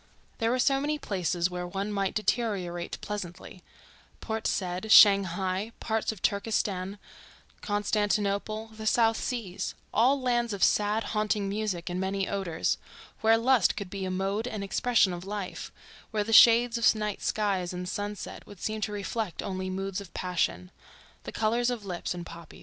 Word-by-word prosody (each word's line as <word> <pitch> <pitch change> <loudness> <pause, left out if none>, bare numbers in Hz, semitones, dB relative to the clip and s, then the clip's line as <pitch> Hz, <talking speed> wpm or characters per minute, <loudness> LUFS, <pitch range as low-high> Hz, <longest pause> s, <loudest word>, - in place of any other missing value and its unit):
There 225 -1 +1
were 250 - +1
so 270 +1 +2
many 300 +1 0
places 180 - -1
where 180 0 -4
one 195 +3 -3
might 195 -1 -1
deteriorate 200 -6 -1
pleasantly: 185 -3 -7 0.6
Port 220 -1 -3
Said, 185 +3 -2
Shanghai, 195 +1 +5
parts 220 -1 -1
of 215 -5 -12
Turkestan, 200 -2 -1 0.6
Constantinople, 205 +1 0
the 220 0 -6
South 225 0 +3
Seas—all 240 +4 -1
lands 240 -3 0
of 195 - -1
sad, 210 +2 +3
haunting 210 -1 0
music 200 -4 -2
and 180 0 -2
many 190 0 -1
odors, 185 -5 -1 0.4
where 225 +1 +5
lust 240 -2 +3
could 200 -3 -6
be 195 -1 -4
a 190 - -2
mode 195 +5 -1
and 215 -4 -4
expression 200 -1 +2
of 175 0 -6
life, 200 -1 -5 0.4
where 215 -2 0
the 225 +2 -3
shades 235 +1 +7
of 230 - +5
night 210 -1 -3
skies 195 -4 0
and 180 0 -5
sunsets 205 +2 -5
would 205 - -12
seem 215 +3 -3
to 210 - -1
reflect 205 -1 -3
only 185 -1 -3
moods 195 +1 -3
of 185 -5 -13
passion: 180 0 -1 0.5
the - - -5
colors 235 +3 +1
of 235 -4 -4
lips 180 -1 -3
and 175 -1 -6
poppies. 170 -1 -11
205 Hz, 160 wpm, -28 LUFS, 185-220 Hz, 0.6 s, shades